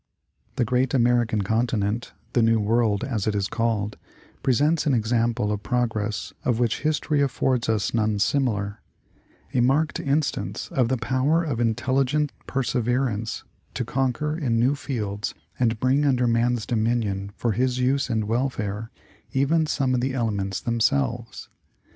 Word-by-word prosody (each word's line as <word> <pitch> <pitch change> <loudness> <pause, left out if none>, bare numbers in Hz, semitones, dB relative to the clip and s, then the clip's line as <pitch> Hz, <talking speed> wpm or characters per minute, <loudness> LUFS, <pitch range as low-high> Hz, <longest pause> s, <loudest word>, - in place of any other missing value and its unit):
The 125 - +1
great 125 +3 +1
American 120 -4 +2
continent, 110 +1 -1 0.2
the 120 - +3
New 115 0 +4
World 110 0 +1
as 115 -7 -2
it 105 - +1
is 100 0 0
called, 110 -3 -1 0.4
presents 150 +6 +2
an 140 - +3
example 115 -1 +1
of 105 -1 -2
progress 110 -4 -1
of 120 -3 +1
which 120 -2 +1
history 155 -1 +1
affords 130 -3 +1
us 110 -1 0
none 110 -2 +1
similar 105 -2 0 0.4
— - - -33
a 130 - +2
marked 140 +6 +2
instance 145 +2 -1
of 130 -8 +2
the 130 +2 0
power 130 +8 +1
of 140 -8 -2
intelligent 130 +5 +1 0.2
persever 125 0 0
ance 110 0 -4 0.3
to - - -2
conquer 135 +3 -1
in 125 -8 0
new 125 +4 +3
fields 105 -8 -3 0.2
and 115 -3 +1
bring 130 +4 +2
under 130 -4 +2
man's 120 -1 +1
dominion 110 -4 -1
for 120 - 0
his 125 +4 0
use 130 +2 +1
and 110 -2 0
welfare 110 -2 -2 0.4
even 155 +4 +2
some 135 -3 0
of 125 - +1
the 130 +1 -1
elements 100 -6 -1
themselves. 115 -1 0
120 Hz, 150 wpm, -24 LUFS, 110-130 Hz, 0.4 s, New